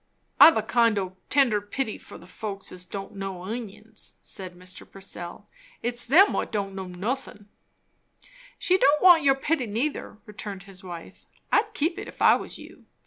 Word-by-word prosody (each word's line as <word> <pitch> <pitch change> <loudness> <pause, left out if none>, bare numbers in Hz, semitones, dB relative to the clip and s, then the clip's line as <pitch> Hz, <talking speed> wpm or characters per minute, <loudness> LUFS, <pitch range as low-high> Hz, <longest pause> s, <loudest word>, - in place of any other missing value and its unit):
"I've 325 - +10
a - - +1
kind 230 -3 +3
o' 185 -1 -3
tender 250 -7 +3
pity 215 +3 -3
for - - -11
the - - -14
folks 200 +1 -6
as 180 0 -9
don't 195 +2 -7
know 195 -2 -5
inguns," 220 0 -8
said 185 -2 -8
Mr. 180 +1 -8
Purcell. 180 -3 -9 0.4
"It's 240 0 -1
them 335 - +6
what - - -2
don't 200 -2 -2
know 190 -1 -6
nothin'." 205 +2 -5 1.1
"She 370 +1 +2
don't 290 0 +4
want 350 -3 +8
your 275 -2 +4
pity, 270 -2 -1
neither," 230 +2 -3
returned 205 -2 -7
his 195 -1 -10
wife. 175 -2 -10 0.2
"I'd 430 0 +2
keep 330 +4 0
it, - - -7
if - - -12
I - - +7
was - - -5
you. - - -14
210 Hz, 175 wpm, -26 LUFS, 190-270 Hz, 1.1 s, I've